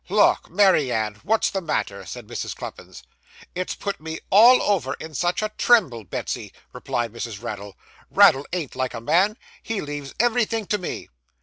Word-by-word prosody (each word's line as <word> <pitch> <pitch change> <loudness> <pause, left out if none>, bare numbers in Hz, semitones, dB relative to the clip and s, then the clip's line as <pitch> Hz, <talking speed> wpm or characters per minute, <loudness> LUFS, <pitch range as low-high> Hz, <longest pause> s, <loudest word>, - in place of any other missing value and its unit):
'Lauk, 205 +2 +3
Mary 180 -8 +4
Ann! 105 -2 -2
what's 220 +3 +1
the 195 - -2
matter?' 100 - -3
said - - -8
Mrs. - - -5
Cluppins. - - -9 0.5
'It's 185 +1 -3
put 200 -5 -5
me 160 0 -5
all 235 +6 +8
over 175 -11 0
in 160 0 -9
such 175 +7 0
a 215 - -2
tremble, 165 - +3
Betsy,' - - -4 0.2
replied 120 -2 -3
Mrs. 115 -2 -6
Raddle. 100 -4 -6 0.3
'Raddle 135 +2 +5
ain't 170 -6 -4
like 130 -1 -2
a - - -4
man; 190 - +2 0.2
he 225 -2 -3
leaves 145 -3 -6
everythink 230 -3 +1
to 210 - +1
me. 180 - -5
165 Hz, 170 wpm, -23 LUFS, -, 0.5 s, all